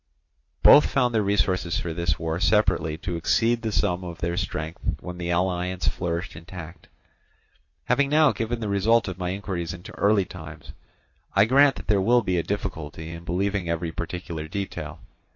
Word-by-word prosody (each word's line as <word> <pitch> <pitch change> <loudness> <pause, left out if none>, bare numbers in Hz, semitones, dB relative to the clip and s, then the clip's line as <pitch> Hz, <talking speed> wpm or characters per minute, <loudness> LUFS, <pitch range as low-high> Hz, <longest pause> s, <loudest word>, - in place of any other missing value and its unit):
Both 150 - +8
found 125 -3 +1
their 110 - +3
resources 95 -4 +1
for 85 -2 -4
this 85 +1 0
war 80 0 -2
separately 95 -7 +2
to 90 0 -4
exceed 115 +8 +2
the 110 -1 -2
sum 90 -3 0
of 85 -2 -7
their 85 0 -2
strength 80 -1 -4 0.2
when 90 0 -8
the 85 0 -3
alliance 90 -1 0
flourished 85 +4 -2
intact. 85 0 -10 1.0
Having 140 -1 +2
now 150 -1 +5
given 115 +1 -3
the 110 - -2
result 105 +4 +2
of 95 -1 -5
my 90 -1 -2
inquiries 90 -3 -4
into 90 - -11
early 100 -1 +3
times, 80 -5 -10 0.6
I 100 +1 +6
grant 135 +4 +5
that - - -9
there 105 -2 +2
will 120 +4 +4
be 90 -2 0
a - - +2
difficulty 80 -6 -5
in 85 0 -8
believing 95 +1 -1
every 85 0 -2
particular 85 -1 -5
detail. 100 +4 -5
90 Hz, 170 wpm, -25 LUFS, 85-105 Hz, 1.0 s, Both